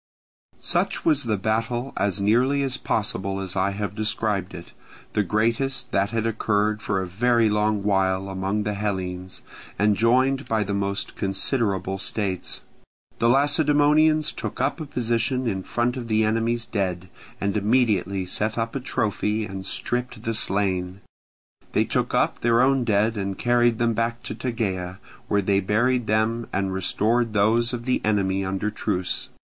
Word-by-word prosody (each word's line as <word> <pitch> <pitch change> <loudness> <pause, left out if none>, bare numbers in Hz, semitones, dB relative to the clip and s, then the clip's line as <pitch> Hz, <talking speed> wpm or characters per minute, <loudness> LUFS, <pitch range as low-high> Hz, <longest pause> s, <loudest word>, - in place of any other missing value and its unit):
Such - - 0
was 145 -5 +2
the 110 -3 0
battle, 115 +5 -1
as 100 -1 0
nearly 125 +8 +2
as 135 -1 0
possible 100 -5 -2
as 95 -1 -3
I 95 +1 +2
have 100 -1 -4
described 105 -3 -1
it; 85 - -10 0.4
the 105 - +2
greatest 115 +6 0
that 100 -3 +1
had 115 0 -1
occurred 105 -1 0
for 100 -1 -1
a 95 - -2
very 115 +4 +2
long 105 -1 +1
while 95 -1 +1
among 95 +2 -2
the 105 0 -2
Hellenes, 95 -3 -4 0.3
and 105 0 +3
joined 130 +5 +2
by 110 -1 +1
the 100 0 -3
most 100 0 -2
considerable 95 -1 0
states. 95 -2 -3 0.6
The 115 - +3
Lacedaemonians 150 +2 +4
took - - -6
up - - 0
a 155 - -5
position 120 0 0
in 95 -5 -1
front 120 +5 -1
of 125 -3 -5
the 110 0 +2
enemy's 115 +2 0
dead, 95 -6 -2 0.3
and 100 +1 -1
immediately 105 -3 +1
set 105 +4 -2
up 115 +1 -2
a - - 0
trophy 110 -3 -1
and 95 -2 -7
stripped 120 0 -2
the 115 - -1
slain; 95 -3 +1 0.7
they - - +3
took - - -1
up - - +1
their 115 0 +3
own 135 -1 +3
dead 110 0 +2
and 100 -1 -3
carried 120 -1 +2
them 115 0 +1
back 115 +1 -2
to - - -4
Tegea, 95 -7 -3 0.3
where 100 -1 +1
they 100 0 +2
buried 115 +5 +1
them, 110 +2 +1
and 95 0 -1
restored 110 +5 +1
those 110 +3 +3
of 120 -1 -5
the 130 - +1
enemy 95 -2 +1
under 95 +2 -2
truce. 95 -5 -2
110 Hz, 160 wpm, -24 LUFS, 100-120 Hz, 0.7 s, Lacedaemonians